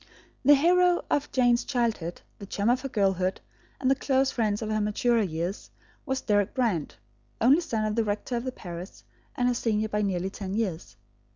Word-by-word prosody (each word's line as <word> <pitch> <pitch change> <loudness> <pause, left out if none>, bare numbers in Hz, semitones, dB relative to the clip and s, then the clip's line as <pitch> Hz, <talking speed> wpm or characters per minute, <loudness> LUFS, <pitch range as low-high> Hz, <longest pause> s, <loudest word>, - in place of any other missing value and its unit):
The 290 +2 +7
hero 355 +4 +3
of 290 0 0
Jane's 245 -2 +3
childhood, 230 -10 -2 0.2
the 200 - -9
chum 205 +4 +1
of 255 +1 +1
her 270 - -4
girlhood 190 -4 0 0.4
and 260 0 +2
the - - +7
close 270 0 +1
friend 215 -3 0
of 220 -1 -3
her 215 0 +1
maturer 225 +3 +2
years, 175 0 -3 0.4
was 265 -1 -1
Deryck 205 -2 +1
Brand, 225 - 0 0.4
only 270 +9 +5
son 225 -10 -2
of 215 - -1
the 230 - +2
rector 210 +4 -2
of 235 - -2
the 255 - -3
parish, 175 -4 -9 0.3
and 245 -2 +1
her 250 - +2
senior 220 -2 0
by 210 0 0
nearly 190 -2 -1
ten 195 -1 -5
years. 180 - -3
220 Hz, 190 wpm, -27 LUFS, 200-255 Hz, 0.4 s, The